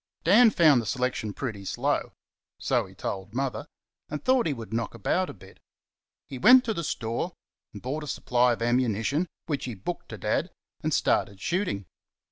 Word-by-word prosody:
Dan 220 +8 +7
found 155 - +5
the 115 - -7
selection 125 -5 -1
pretty 110 -3 -5
slow 95 - -1 0.4
so - - 0
he - - -16
told 95 +2 -5
Mother 135 +2 -2 0.4
and 150 0 -5
thought 255 -4 +3
he - - +1
would 115 -4 -8
knock 115 0 -2
about 180 - 0
a - - -4
bit. 90 - -16 0.7
He 130 - -8
went 250 - +8
to 225 - 0
the 170 - -3
store 120 +5 -2 0.4
and 105 - -10
bought 145 +5 -3
a - - -7
supply 125 -2 +2
of 115 - -4
ammunition, 120 - +1 0.2
which 145 -5 -2
he 125 -3 -5
booked 95 - -6
to - - -7
Dad, - - 0 0.3
and - - -1
started 100 -1 +1
shooting. 170 - -1
130 Hz, 180 wpm, -27 LUFS, 115-165 Hz, 0.7 s, went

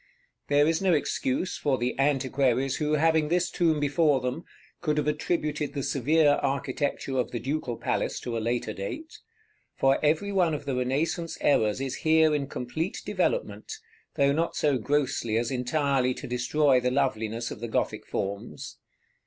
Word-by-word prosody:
There 145 0 +4
is 165 +2 +1
no 190 -2 +3
excuse 145 +2 -1
for 140 -3 +1
the 125 +1 -1
antiquaries 135 -1 +1
who, 150 -1 0
having 160 0 +3
this 175 +2 +1
tomb 160 -3 +2
before 145 0 +2
them, 125 +6 -4 0.4
could 150 -3 0
have 150 -1 0
attributed 150 -1 -1
the 140 - -2
severe 145 +3 +3
architecture 135 -1 -1
of 125 - 0
the - - -4
Ducal 130 -2 -3
Palace - - -1
to 120 - -4
a - - 0
later 115 -1 -1
date; 305 - -7 0.6
for 135 +2 +2
every 160 +7 +2
one 180 -5 +2
of 145 - -7
the 135 -2 -2
Renaissance 155 +7 -1
errors 110 -5 +2
is 135 -1 -3
here 160 -1 +4
in 140 -2 -1
complete 155 +9 -4
developement, - - -1 0.4
though 140 -2 +3
not 165 +4 0
so 145 -4 +1
grossly 130 -3 0
as 115 +1 -1
entirely 130 0 +1
to - - -8
destroy 125 +3 +2
the 125 0 0
loveliness 115 -4 -1
of - - -7
the 120 - -4
Gothic 110 - -2
forms. 100 +1 -5
140 Hz, 165 wpm, -27 LUFS, 125-155 Hz, 0.6 s, There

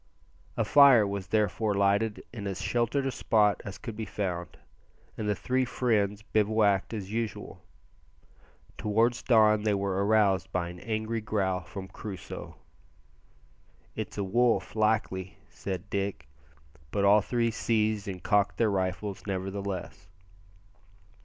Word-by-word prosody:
A - - +1
fire 140 -7 +7
was 100 -1 -4
therefore 105 0 +1
lighted 100 +2 +1
in 105 -4 -5
as 95 -2 -4
sheltered 120 +3 0
a 135 - 0
spot 105 -4 +2
as 100 -4 -7
could 115 -7 -7
be 110 0 -4
found, 90 -4 -4 0.6
and 105 -1 -3
the 105 - +1
three 130 +4 0
friends 105 -5 0
bivouacked 105 -2 +2
as 100 -3 -5
usual. 115 -1 -4 1.2
Towards 115 +3 +1
dawn 110 -3 +4
they 105 -1 +1
were 100 0 -1
aroused 100 -3 +2
by 90 -2 -1
an 90 0 -10
angry 110 +1 -2
growl 95 -3 -1
from 95 +2 -8
Crusoe. 95 -1 -8 1.4
"It's - - -5
a 100 - 0
wolf 120 +5 +1
likely," 105 -4 0
said 95 0 -5
Dick, 100 -8 -3 0.6
but 100 +6 0
all 105 +1 +6
three 115 +2 0
seized 110 -2 0
and 95 -2 -6
cocked 105 -1 +2
their 110 -3 +2
rifles 95 +1 -3
nevertheless. 95 -2 -4
105 Hz, 135 wpm, -28 LUFS, 95-110 Hz, 1.4 s, fire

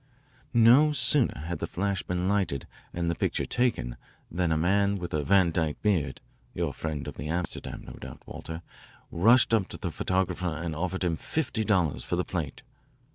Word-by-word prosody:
"No 125 +7 +7
sooner 140 - +3
had 85 0 -4
the - - -2
flash 100 +1 -1
been 90 0 -2
lighted 95 -9 0 0.3
and 85 -1 -2
the 85 - +1
picture - - -1
taken 60 - 0 0.3
than 85 0 0
a 80 - +2
man 100 +4 +2
with 90 -2 -6
a 75 -1 0
Van 95 +1 +4
Dyke 80 -2 -1
beard 95 -8 +1 0.3
your - - -1
friend 75 -3 -4
of - - -7
the 75 - -5
Amsterdam, 85 +3 -3
no - - -9
doubt, - - -10
Walter, 80 +1 -7 0.5
rushed 115 +7 +5
up 105 -4 +3
to - - -6
the - - -4
photographer 90 -3 -1
and 85 -2 -3
offered 95 +3 -2
him 85 -3 0
fifty 130 - -1
dollars 90 - +1
for - - -2
the 90 - 0
plate. 80 -7 -4
90 Hz, 185 wpm, -28 LUFS, 80-100 Hz, 0.5 s, No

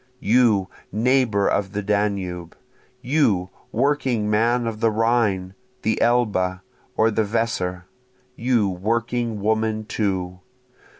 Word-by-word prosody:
You 110 -5 +3 0.2
neighbor 115 -2 +2
of 100 0 0
the 105 0 -2
Danube! 95 -4 -2 0.5
You 115 - +1 0.2
working 125 -4 0
man 120 +3 +2
of 115 -2 -4
the 115 - +3
Rhine, 110 -4 +1 0.3
the 110 +1 0
Elbe, 100 -6 +1 0.4
or 110 +1 +3
the 110 - +1
Weser! 100 -5 -2 0.5
you 120 -4 +1
working 115 +3 -2
woman 110 +1 0
too! 95 -4 -2
110 Hz, 110 wpm, -22 LUFS, 100-115 Hz, 0.5 s, You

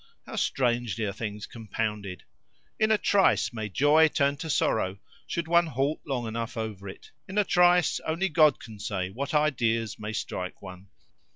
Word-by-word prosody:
How - - -8
strangely 120 -4 0
are 100 - -3
things 105 0 -5
compounded! 105 -4 -4 0.6
In 215 - +3
a 220 - +4
trice 200 -10 +2
may 110 -2 -4
joy 145 - +5
turn 140 -2 +1
to 160 +3 -6
sorrow, 100 -8 +1 0.3
should 170 -1 -3
one 170 0 +4
halt 140 +1 -1
long 130 -4 -2
enough 115 +1 -4
over 105 -3 -5
it: 95 - -12 0.2
in 195 - -6
a 210 - +5
trice 180 -2 +4
only 165 +5 -1
God 155 -4 +4
can 110 -4 -11
say 95 -2 -3
what 140 +8 -4
ideas 115 -7 +1
may 105 +1 -5
strike 90 -3 -4
one. 90 +1 -11
120 Hz, 170 wpm, -27 LUFS, 105-155 Hz, 0.6 s, joy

